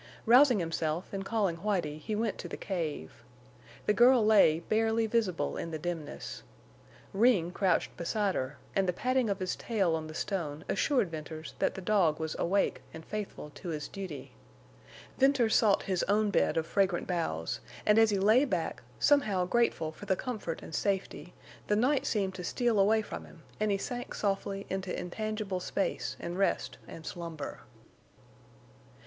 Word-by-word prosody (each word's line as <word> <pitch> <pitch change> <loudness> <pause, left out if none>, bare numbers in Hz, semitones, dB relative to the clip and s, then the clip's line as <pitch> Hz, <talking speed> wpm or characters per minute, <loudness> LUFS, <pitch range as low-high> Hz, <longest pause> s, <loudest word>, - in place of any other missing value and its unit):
Rousing 250 +1 +7
himself 165 0 -2
and 195 0 -3
calling 195 -5 0
Whitie, 170 -6 -1
he 215 +6 -3
went 220 -1 -1
to - - -5
the - - -6
cave. 155 - -4 0.6
The 210 - +3
girl 240 0 +6
lay 195 -7 +5
barely 225 +4 +1
visible 215 -6 0
in - - -4
the 160 - -3
dimness. 165 -2 -5 0.7
Ring 195 -5 +3
crouched 185 -2 +1
beside 200 +3 0
her, 130 0 -3 0.2
and 195 -2 +2
the - - +1
patting 255 +3 +1
of 200 - 0
his 185 -1 -2
tail 195 -8 0
on 160 -1 -4
the 155 - -9
stone 155 -7 -3
assured 250 - +1
Venters 155 -1 -7
that - - +1
the 190 - -6
dog 180 -7 +2
was 160 0 -3
awake 195 +3 +1
and 160 0 -9
faithful 205 -7 -6
to 175 - -8
his 150 -2 -3
duty. 185 -8 -7 0.9
Venters 265 -4 +4
sought 210 -3 +4
his 185 -2 0
own 210 +1 +2
bed 185 - +2
of 160 - +1
fragrant 190 -1 +1
boughs; 80 - -2 0.3
and 210 +1 +5
as 225 -1 +6
he 205 - +1
lay 215 +7 +5
back, 180 - -2 0.2
somehow 210 - +3
grateful 180 -6 +1
for 205 +6 -11
the 190 - +3
comfort 215 -8 -4
and - - -10
safety, 190 -1 -2 0.3
the 210 - +2
night 260 +6 +2
seemed 195 -3 0
to 185 -1 -7
steal 235 +4 +1
away 215 +3 +4
from - - -7
him - - -16 0.2
and 215 0 +1
he 200 - +2
sank 245 +5 -5
softly 195 -1 -2
into 190 -1 -3
intangible 210 +1 -3
space 195 +2 -2
and 175 +2 -5
rest 195 - 0
and 160 - -10
slumber. 165 -4 -6
195 Hz, 170 wpm, -30 LUFS, 165-215 Hz, 0.9 s, Rousing